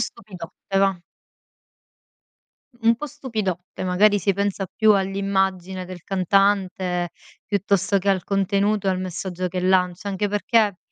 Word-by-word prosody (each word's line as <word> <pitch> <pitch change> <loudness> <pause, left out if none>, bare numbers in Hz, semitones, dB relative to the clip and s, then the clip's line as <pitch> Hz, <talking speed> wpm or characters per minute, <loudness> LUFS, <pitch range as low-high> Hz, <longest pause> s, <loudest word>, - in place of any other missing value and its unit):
stupidotte, 195 -3 -5
và. 195 -1 +3 1.9
Un 230 +1 +4
po' 300 - -5
stupidotte, 215 - -4
magari 205 +3 +4
si 200 +1 +1
pensa 200 0 -2
più 215 +4 +3
all'immagine 190 -1 -1
del 180 -1 -9
cantante, 190 -2 +1 0.4
piuttosto 200 0 +1
che 195 +1 -3
al 190 -2 +2
contenuto 200 +1 +1
e - - +4
al 185 -1 -1
messaggio 185 0 -4
che 180 +1 -3
lancia; 180 0 +1
anche 200 +1 -1
perché, 205 -1 +2
195 Hz, 125 wpm, -23 LUFS, 185-205 Hz, 1.9 s, Un